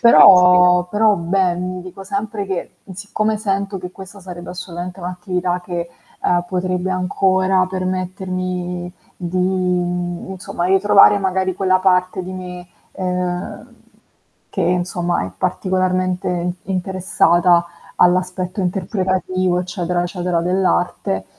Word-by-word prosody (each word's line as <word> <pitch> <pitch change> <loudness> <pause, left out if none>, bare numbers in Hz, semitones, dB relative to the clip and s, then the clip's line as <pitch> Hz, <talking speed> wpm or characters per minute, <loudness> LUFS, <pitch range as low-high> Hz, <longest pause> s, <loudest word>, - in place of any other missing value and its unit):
Però 180 -5 +7
però 210 +1 +4
beh, 180 +1 +1
mi 180 0 -4
dico 185 +1 -10
sempre 200 +1 -3
che, 190 -3 -3
mhmm, 190 - -10
siccome 215 +3 -1
sento 200 -2 -2
che 180 0 -7
questa 195 +1 -11
sarebbe 175 -2 -8
assolutamente 180 0 -7
un'attività 180 0 -2
che, 170 -1 -4 0.4
uhm, 175 0 +2
potrebbe 185 0 -1
ancora 185 0 +2
permettermi 185 -1 -3 0.2
di 175 0 -4
in 180 -1 -1
insomma, 180 -2 -4
ritrovare 195 +2 +6
magari 190 -1 0
quella 185 0 +2
parte 185 0 +1
di 185 - -6
me, 180 -1 -7 0.3
ehm, 180 -1 -4 0.8
che - - -4
insomma 175 - 0
è - - -8
particolarmente 185 - 0
in 175 0 -1
interessata 180 -2 +2 0.3
all'aspetto 180 +1 +1
interpretativo, 185 -1 0
eccetera 175 -1 -2
eccetera, 175 -1 -1
dell'arte. 180 - 0
185 Hz, 115 wpm, -19 LUFS, 180-190 Hz, 0.8 s, Però